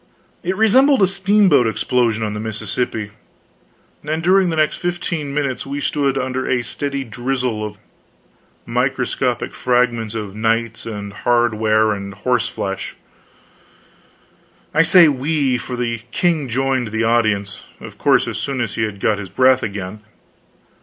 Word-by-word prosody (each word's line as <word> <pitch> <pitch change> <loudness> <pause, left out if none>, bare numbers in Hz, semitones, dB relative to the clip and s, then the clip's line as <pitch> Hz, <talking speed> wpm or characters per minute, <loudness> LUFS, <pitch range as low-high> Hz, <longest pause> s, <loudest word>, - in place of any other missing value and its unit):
It 185 +2 -2
resembled 255 +3 +5
a - - +5
steamboat 195 - +3
explosion 115 +1 0
on 105 -1 -2
the 105 - -4
Mississippi; 110 0 -3 0.9
and 155 +2 -2
during 185 +1 +4
the 165 - -1
next 155 -1 +1
fifteen 170 -4 -3
minutes 140 -3 -2
we 140 +1 -5
stood 140 -1 0
under 130 0 -2
a 125 -2 +1
steady 140 +1 -3
drizzle 125 -1 -2
of 105 -1 -6 0.9
microscopic - - -1
fragments 120 -3 0
of 105 -3 -5
knights 115 +1 -1
and 100 -2 -6
hardware 110 -2 +2
and 100 -1 -5
horse 120 +2 0
flesh. 95 -5 -5 1.8
I 160 - +5
say 165 +1 +7
we, 140 -2 0
for 125 +1 -5
the 115 -2 -2
king 155 +1 0
joined 130 0 0
the 110 +1 -2
audience, 110 -4 +1 0.2
of - - -11
course, - - +3
as - - -4
soon 135 -2 -3
as 115 -3 -2
he - - -3
had 105 -2 -2
got 105 +1 +1
his 95 -2 -7
breath 130 +3 +4
again. 100 0 -5
125 Hz, 145 wpm, -19 LUFS, 110-145 Hz, 1.8 s, say